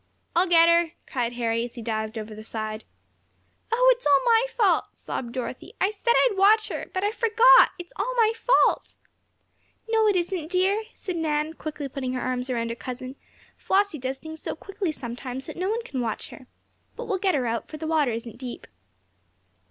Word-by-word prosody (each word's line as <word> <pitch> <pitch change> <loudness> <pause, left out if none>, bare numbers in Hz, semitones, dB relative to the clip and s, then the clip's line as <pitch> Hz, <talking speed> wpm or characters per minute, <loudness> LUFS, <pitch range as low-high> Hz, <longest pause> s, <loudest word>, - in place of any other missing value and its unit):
"I'll 355 +3 +4
get 335 -1 +7
her!" 335 -1 +3
cried 245 -2 -2
Harry, 230 -1 0
as 240 - -7
he 235 - -7
dived 220 0 -3
over 215 0 -6
the 215 +1 -9
side. 215 0 -5 0.9
"Oh, - - +6
it's 475 - -4
all 285 -1 +6
my 470 +1 +4
fault!" 420 -5 +3
sobbed 240 -2 -5
Dorothy. 250 0 -6
"I 390 - +2
said 470 +3 +1
I'd - - +3
watch 425 +3 +4
her. - - -5
But 375 - -2
I 410 - +1
forgot! 460 +2 +6
It's 350 -1 -10
all 425 +6 -1
my 450 -2 +4
fault!" - - +2 0.9
"No, 445 -1 +3
it 410 - +3
isn't, 350 -3 -2
dear!" 390 +4 +1
said 370 -4 -5
Nan, 310 -1 -1
quickly 305 -3 -6
putting 260 -1 -4
her 255 - -2
arms 255 0 -2
around 230 -2 -1
her 230 - -3
cousin. 255 +1 -7 0.4
"Flossie 395 -5 +1
does 260 +1 -3
things 315 +2 -10
so - - -4
quickly, 390 -3 -4
sometimes, 255 -1 -6
that - - -8
no 370 +2 -2
one 460 +2 -1
can 265 - -4
watch 225 -3 -3
her. 260 - -13 0.5
But - - -6
we'll 395 -4 -1
get 375 -3 +2
her 260 -3 0
out, 230 0 -2
for 310 - -8
the 315 - -6
water 315 -4 +2
isn't 230 0 -6
deep." 250 -2 -7
315 Hz, 200 wpm, -25 LUFS, 245-400 Hz, 0.9 s, get